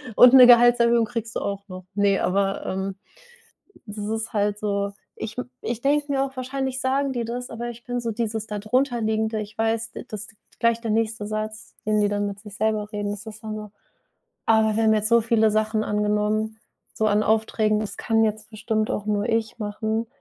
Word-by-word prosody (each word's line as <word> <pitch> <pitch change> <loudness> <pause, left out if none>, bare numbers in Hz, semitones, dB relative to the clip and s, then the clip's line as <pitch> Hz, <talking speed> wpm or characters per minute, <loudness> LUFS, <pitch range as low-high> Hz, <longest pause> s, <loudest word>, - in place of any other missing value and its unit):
Und 250 0 +8
'ne 255 -2 +10
Gehaltserhöhung 235 -1 +6
kriegst 225 -1 -5
du - - 0
auch 200 0 -4
noch." 185 -2 -9
Ne, 200 -1 +3
aber, 195 +1 0
ähm, 190 +1 -3 0.9
das 210 +1 -8
ist 220 +1 -3
halt 205 -1 0
so 200 -1 -1 0.3
ich 220 +1 -5
m 250 - -4
ich 235 0 -3
denke 290 +1 +2
mir 275 -1 +2
auch, 270 -1 -7
wahrscheinlich 260 0 -3
sagen 270 +1 0
die 240 -2 -2
das, 245 +2 -5
aber 235 +1 -5
ich 235 0 -12
bin 245 0 -2
so 235 -1 -2
dieses 220 -1 -3
da 210 -1 -4
darunterliegende, 220 -1 0
ich 210 0 -8
weiß, 225 0 -1
d - - -8
das 215 0 -6 0.3
gleich 230 0 +2
der 230 - -3
nächste 220 -1 0
Satz, 215 0 -5
den 215 0 +2
die 205 - +3
dann 205 0 -1
mit 200 0 -6
sich 210 -2 -11
selber 215 -1 0
reden, 205 -1 -2
das 205 +2 -8
ist 220 0 -9
dann 215 0 -4
so: 210 -1 -8 0.8
„Ah, 220 -1 +4
wir 225 - +2
haben 220 0 +5
jetzt 215 0 +1
so 235 0 +5
viele 220 -1 +3
Sachen 215 0 +1
angenommen, 210 +1 0 0.4
so 220 - +1
an 210 0 +3
Aufträgen, 215 0 +2
das 215 - -4
kann 225 -1 +2
jetzt 215 0 -3
bestimmt 215 0 -1
auch 210 - -3
nur 210 +1 0
ich 225 0 -1
machen." 220 +1 -2
220 Hz, 205 wpm, -24 LUFS, 210-230 Hz, 0.9 s, ne